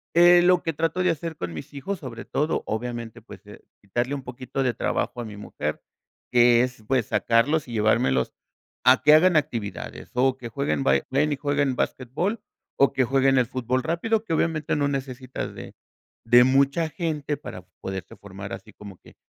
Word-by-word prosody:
Eh, 175 +1 +7
lo 180 0 +4
que 165 - -1
trato 165 +4 -1
de 180 - +3
hacer 165 0 -5
con 85 -1 -5
mis 80 - -9
hijos, 185 +7 -4
sobre 120 -5 -8
todo, 150 +3 -1
obviamente, 115 0 -4
pues, - - -13
de - - -14 0.2
quitarle 120 +7 -2
un 135 - -7
poquito 130 +2 -4
de 125 -2 +1
trabajo 120 - -2
a - - -5
mi 105 -2 -8
mujer, 105 - -5 0.5
que 120 -1 +5
es, 125 -3 -5
pues, 130 -5 +1
sacarlos 140 +7 +2
y 120 - -8
llevármelos 105 - +2 0.5
a - - +6
que 150 - +7
hagan 175 +3 +6
actividades, 120 -9 -3
o 130 +1 +2
que 120 - -7
jueguen 140 +2 -1
ba - - +4
y - - -4
ven 145 +3 +2
que - - +1
jueguen 145 -2 0
basquetbol, 150 - -2 0.4
o 140 - +4
que 135 - +2
jueguen 135 +1 +3
el 125 - +4
fútbol 130 0 -1
rápido, 210 +7 0
que, 195 - -8
obviamente, 155 -2 0
no 145 -1 +1
necesitas 130 -2 -4
de - - -10 0.5
de 120 +1 +7
mucha 140 +5 +2
gente 150 -3 -3
para 90 -9 -9 0.2
poderse 95 -2 -6
formar - - -9
así - - -9
como 100 -3 -11
que - - -19
135 Hz, 190 wpm, -24 LUFS, 120-155 Hz, 0.5 s, Eh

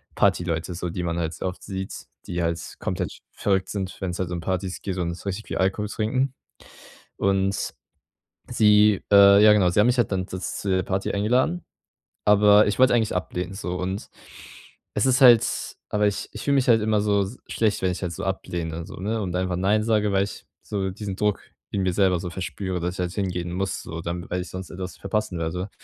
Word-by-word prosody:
Party - - +3
Leute 85 0 -2
so, 90 0 -3
die 90 +1 -4
man 85 0 -2
halt 80 -1 -2
so 80 - -6
oft 90 0 -4
sieht, 95 -1 -5 0.3
die 85 0 -2
halt 85 0 0 0.2
komplett - - -3
verrückt 95 -2 0
sind, 95 -2 -4
wenn's 90 -2 -3
halt 90 -2 -2
um 85 - -2
Partys 95 +1 -3
geht 95 -2 -4
und 85 -1 -1
so 90 - -11
richtig 100 +3 -4
viel - - -3
Alkohol 95 +3 0
trinken. 130 +5 0 0.9
Und 95 0 0 0.8
sie 105 -3 +5
äh, 100 0 +8
ja 105 - +8
genau, 95 -4 +4
sie 105 - +3
haben 105 - +5
mich 125 0 +2
halt 120 - +2
dann 95 -1 -1
da 95 - -6
z 90 - -9 0.2
zu 100 - -4
der 95 0 +2
Party 95 0 -1
eingeladen, 125 - +1 0.6
aber 105 0 +6
ich 105 - -1
wollte 130 -1 +6
eigentlich 110 -4 +1
ablehnen 90 0 -3
so. 90 -2 -4
Und 95 +2 -4 0.9
es - - +2
ist 130 +1 +3
halt 120 -4 +8 0.4
aber 105 0 +2
ich 100 - -3
ich - - -7
fühle 140 - +2
mich 135 -2 +2
halt 115 -2 +5
immer 110 0 +2
so 100 -1 +2
s 105 +7 -7
schlecht, 110 -2 0
wenn 95 - +1
ich 90 - -5
halt 90 - -2
so - - -5
ablehne 85 -1 -3
so, - - -10
ne, 110 +4 -2
und 90 -3 -3
einfach 90 0 0
nein 100 +4 +2
sage, 105 -2 +2
weil 95 0 +3
ich 100 - -10 0.2
so 100 -2 -2
diesen 100 0 -5
Druck 105 -1 0 0.3
in 100 - -1
mir 95 -1 +1
selber 95 -2 +3
so 90 - -5
verspüre, 90 +2 -4
dass 90 +2 -2
ich - - -10
halt 90 -1 -2
hingehen 90 -3 -2
muss 95 +1 -2
so, 80 -1 -6
dann 85 +1 -5
weil 90 +1 -1
ich 90 - -8
sonst 95 0 -7
etwas 90 0 -6
verpassen 100 -2 -2
werde. 90 +4 -3
95 Hz, 220 wpm, -24 LUFS, 90-105 Hz, 0.9 s, äh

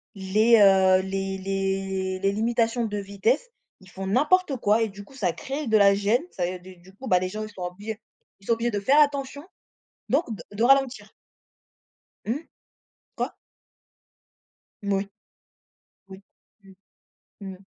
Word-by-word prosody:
les, 215 +4 +3
heu, 190 -1 +6
les 195 0 -3
les 195 -1 -2
les 195 0 +1
limitations 230 +2 0
de 210 -1 -3
vitesse. 205 - -1 0.3
Ils 190 - -17
font 190 0 -7
n'importe 295 - +2
quoi 215 +1 +2
et - - 0
du 200 +1 -11
coup, 270 - -18
ça 180 -9 -1
crée 275 - -5
de 220 -1 +4
la 200 -1 +5
gêne. 210 +6 +1
Ça 180 - -2
et 180 - -3
et - - -9
du 185 0 -14
du 185 +2 -19
coup, 260 +4 -9
bah, 180 -1 +4
les 185 0 -3
gens, 215 +2 -5
ils 215 - -7
sont 185 - -7
obligés 205 +5 -6 0.4
ils 195 - -21
sont 230 - +4
obligés 230 +1 -1
de 205 - -1
faire 275 +9 +4
attention, 285 0 -1 0.7
donc 290 +6 +2
de 165 - -11
de 230 - +1
ralentir. 255 -5 +2 1.1
Mmh? 270 +9 -4 0.7
Quoi? - - -2 1.5
Mmh 200 0 -1
oui. 195 +1 -1 1.0
Oui. 190 0 -10 0.4
Mmh. 195 0 -16 0.8
Mmh. - - -11
205 Hz, 165 wpm, -25 LUFS, 190-240 Hz, 1.5 s, heu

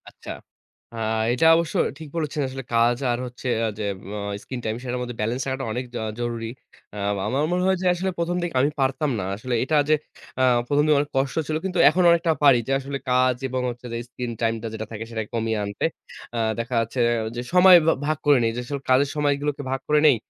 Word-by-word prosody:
আচ্ছা। - - -10 0.6
আ - - -8 0.4
এটা 125 +6 +1
অবশ্য 165 -1 -1 0.2
ঠিক 160 - -8
বলেছেন 155 -1 -2
আসলে 135 +1 -6
কাজ 120 +1 +3
আর 120 - 0
হচ্ছে 125 +1 -8 0.3
যে - - -2 0.2
উম 100 - -7 0.3
স্কিন 130 - -6
টাইম 110 0 -2
সেটার 125 -1 -3
মধ্যে 125 -1 -5
বেলেন্স 115 +4 -1
রাখাটা 135 0 -3
আ - - -3
অনেক 125 +2 -3 0.3
জরুরি। 115 -1 -3 0.5
আ - - -7 0.3
আমার 135 +3 0
মনে 180 0 +1
হয় 190 0 +3
যে - - -3
আসলে 185 +2 -2
১ম 170 +1 -1
দিকে 175 -1 -3
আমি 140 - +3
পারতাম 135 +3 +1
না। - - -2
আসলে 120 +4 -3
এটা 155 +4 0
যে 155 - +6 0.4
অ্যা 130 - +3 0.2
১ম 145 +2 +2
দিনে 155 -1 +4
অনেক 145 0 -1
কষ্ট 135 -1 0
ছিল 155 - -1
কিন্তু 185 -2 -1
এখন 180 - +1
অনেকটা 170 0 +3
পারি 135 -4 +7
যে - - -1
আসলে 140 +1 -4
কাজ 125 0 +3
এবং 130 0 -2
হচ্ছে 120 0 -8
যে - - -2
স্কিন 125 -1 -5
টাইম 115 -1 +2
টা 115 - -4
যেটা 110 0 -4
থাকে 110 0 -5
সেটাকে 110 -2 -4
কমিয়ে 110 -1 -1
আনতে। 100 0 -3 0.5
আ - - -1 0.2
দেখা 120 +2 -3
যাচ্ছে 115 +3 -2 0.4
যে 120 - -3
সময় 180 0 +8
ভা - - +6
ভাগ 155 +1 0
করে 145 -2 +6
নেই। 115 - +2
যে - - -3
আসলে 140 +2 -4
কাজের 135 +2 +4
সময়গুলোকে 145 0 0
ভাগ 135 - -1
করে 150 0 +4
নেই। 140 - +6
130 Hz, 220 wpm, -24 LUFS, 120-150 Hz, 0.6 s, সময়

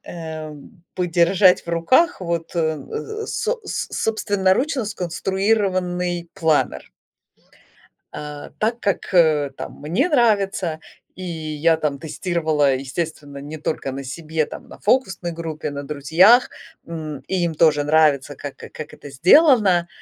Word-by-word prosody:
эм, 160 0 -9
подержать 180 +2 +3
в - - -14
руках 225 - +2
вот, 170 -1 -3
э, - - +2 0.2
э, 440 0 -6
со 470 +2 -2
с 395 - -3
собственноручно 220 +5 0
сконструированный 185 -2 -1
планер. 160 -5 0 1.2
А, 150 -1 -7
так 230 +2 0
как, 200 -1 -2
э, 155 -5 +4
там - - -8
мне 190 - 0
нравится, 200 - +1 0.4
и 185 - -8
я 160 -1 0
там 145 -3 -2
тестировала, 155 -3 0
естественно, 145 +1 -5
не 145 +3 -7
только 150 -3 -3
на 135 +1 -6
себе, 155 +3 -2
там - - -10
на - - -12
фокусной 190 -7 0
группе, 160 -3 -5
на 140 0 -5
друзьях, 160 - +4 0.4
м, 155 -4 -6
и 185 -2 0
им 165 -2 -1
тоже 150 -2 +4
нравится, 145 -2 +2
как 145 0 -7
как 155 - -9
это 145 - -11
сделано. 185 - +5
170 Hz, 130 wpm, -21 LUFS, 150-195 Hz, 1.2 s, сделано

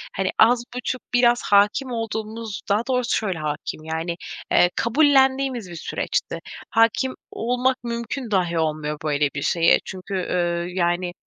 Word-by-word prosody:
Hani, 190 -1 0
az 240 +2 +5
buçuk, 250 0 -3
biraz 240 0 +4
hâkim 205 +6 +4
olduğumuz, 220 -1 -4
daha 205 +2 +3
doğrusu 250 -2 +1
şöyle 190 -6 -2
hâkim, 155 0 -4
yani, 160 +2 -3 0.4
eee, 175 - +5
kabullendiğimiz 265 - +3
bir 170 - -8
süreçti. 165 - -2 0.3
Hâkim 230 +3 +2 0.2
olmak 250 +3 0
mümkün 235 +1 -4
dâhi 175 -4 +1
olmuyor 155 -1 -1
böyle 145 -1 +1
bir 140 - -2
şeye 165 +3 +4
çünkü, 190 +1 -7
ııı, 175 -2 -1
yani, 175 0 0
210 Hz, 140 wpm, -23 LUFS, 170-245 Hz, 0.4 s, az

